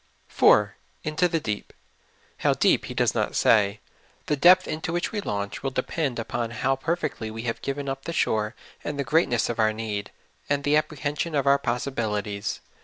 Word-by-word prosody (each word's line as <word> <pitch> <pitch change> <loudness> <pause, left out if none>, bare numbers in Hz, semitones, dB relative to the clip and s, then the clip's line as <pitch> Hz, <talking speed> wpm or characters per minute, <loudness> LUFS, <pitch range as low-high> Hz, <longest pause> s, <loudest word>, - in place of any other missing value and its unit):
4. - - +4
'' - - -38
Into 160 +4 +1
the 165 -1 0
deep 105 -8 -4
y - - -37 0.6
How - - +2
deep - - +3
He - - -7
does - - +2
not - - -1
sa3^ 100 -1 +3 0.5
The 150 - +1
depth 180 +5 +6
into 160 +2 -3
which 175 +1 -1
we 210 -2 -2
launch 100 - -3
will 135 - -1
depend 135 +1 -2
upon 115 0 -2
how 125 +4 0
perfectly 135 -6 -2
we 110 +1 -6
have 115 -2 -3
given 140 0 -3
up 135 0 -4
the 170 - -3
shore 110 -7 0 0.3
and 150 - -4
the 140 - 0
greatness 135 -4 +2
of 120 - -4
our 110 0 +3
need, 110 -2 -4 0.4
and 140 0 +1
the 145 +1 +3
apprehension 155 +1 -1
of 140 -1 +1
our 140 0 +5
possibilities. 110 -5 -2
135 Hz, 190 wpm, -25 LUFS, 110-150 Hz, 0.6 s, depth